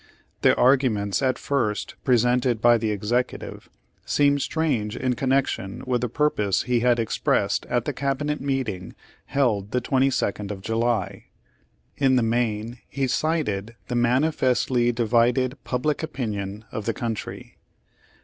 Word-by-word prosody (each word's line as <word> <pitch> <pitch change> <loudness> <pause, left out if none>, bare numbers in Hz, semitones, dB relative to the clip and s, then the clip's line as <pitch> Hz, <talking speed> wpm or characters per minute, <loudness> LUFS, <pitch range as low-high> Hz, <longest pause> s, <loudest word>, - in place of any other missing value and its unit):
The - - +5
arguments 125 -6 +2
at 130 -1 +1
first 120 -7 -1
presented 125 -1 +2
by 120 +1 +5
the 110 - -1
Executive, 110 +5 -2 0.3
seem 145 0 +2
strange 135 -9 -1
in 130 -1 0
con 130 +2 -2
nection 125 -3 -1
with 125 -2 0
the 125 - -1
purpose 105 -8 +1
he 125 -1 +1
had 120 0 +3
expressed 115 -2 0
at 120 -1 0
the 145 - -2
cabinet 140 +2 -2
meeting 130 -10 -3 0.3
held 110 -8 +1
the 125 - 0
22nd 125 -6 0
of 95 -2 -6
July. 115 +1 -1 0.7
In 135 -2 +3
the 125 - +3
main 115 0 -1
he 135 -1 -1
cited 125 -7 -1
the 125 - -1
manifestly 125 -1 +2
divided 120 +3 +1
public 135 +4 -1
opinion 105 -9 -4
of 110 - -5
the 115 - 0
country. 115 -3 -5
120 Hz, 135 wpm, -24 LUFS, 110-135 Hz, 0.7 s, The